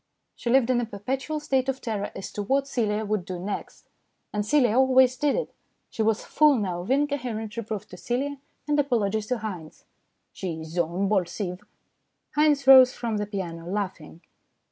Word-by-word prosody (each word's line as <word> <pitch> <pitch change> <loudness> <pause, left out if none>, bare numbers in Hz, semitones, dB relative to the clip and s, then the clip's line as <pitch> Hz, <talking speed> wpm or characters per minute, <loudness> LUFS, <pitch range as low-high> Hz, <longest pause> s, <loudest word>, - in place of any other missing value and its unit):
She 235 - -4
lived 255 0 +4
in 240 -1 +2
a - - -1
perpetual 260 +8 -3
state 270 -3 0
of 265 0 -2
terror 215 -5 -3
as 195 - -6
to 205 - -4
what 270 +6 +1
Celia 220 -5 -1
would 210 -2 -1
do 185 0 -5
next, 195 +3 -6 0.5
and 210 0 0
Celia 245 -1 +3
always 260 0 +5
did 285 +2 +1
it. - - -3 0.4
She - - -3
was 220 0 +1
full 300 -1 +4
now 185 -5 -2
of 180 - -8
incoherent 255 -6 -1
reproof 215 -3 -5
to 180 - -10
Celia 275 +7 -2 0.3
and 295 0 +2
apologies 220 -6 0
to 250 - 0
Haynes. 185 -8 -7 0.2
" - - -50
She 165 -4 -5
is 160 - -8
zo 170 0 0
imbolsive." 185 0 -1 0.7
Haynes 295 -2 +3
rose 260 -1 +9
from 230 -3 -2
the 210 0 -2
piano 170 -5 -5
laughing. 185 -5 -4
220 Hz, 180 wpm, -26 LUFS, 195-265 Hz, 0.7 s, rose